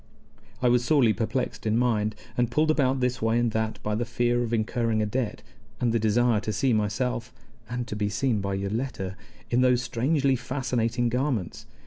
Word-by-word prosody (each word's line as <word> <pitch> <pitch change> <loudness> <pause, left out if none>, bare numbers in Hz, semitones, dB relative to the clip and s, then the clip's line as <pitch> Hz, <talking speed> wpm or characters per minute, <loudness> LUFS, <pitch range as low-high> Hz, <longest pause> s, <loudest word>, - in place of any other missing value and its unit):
I - - +5
was 120 0 +3
sorely 125 -5 +4
perplexed 120 0 -2
in 110 +1 +2
mind, 110 -3 +1 0.2
and 120 -1 +1
pulled 155 +5 +2
about 135 -3 +1
this 125 0 0
way 115 +1 +2
and 120 -1 +1
that 110 0 -1
by 105 - -1
the 110 +3 0
fear 120 +1 0
of 120 -1 -2
incurring 115 0 0
a 110 - +1
debt, 110 0 -2 0.4
and 120 -2 +1
the 115 - +1
desire 110 +1 +3
to 110 - -3
see 125 +4 +1
myself 110 +3 -1 0.4
(and 125 0 -3
to - - -4
be 105 -1 -1
seen 115 0 0
by 100 0 -2
Yoletta) 100 -1 -3 0.4
in 120 +1 +3
those 125 -1 +3
strangely 135 +4 +1
fascinating 125 -2 -1
garments. 125 -6 -2
120 Hz, 185 wpm, -26 LUFS, 110-125 Hz, 0.4 s, I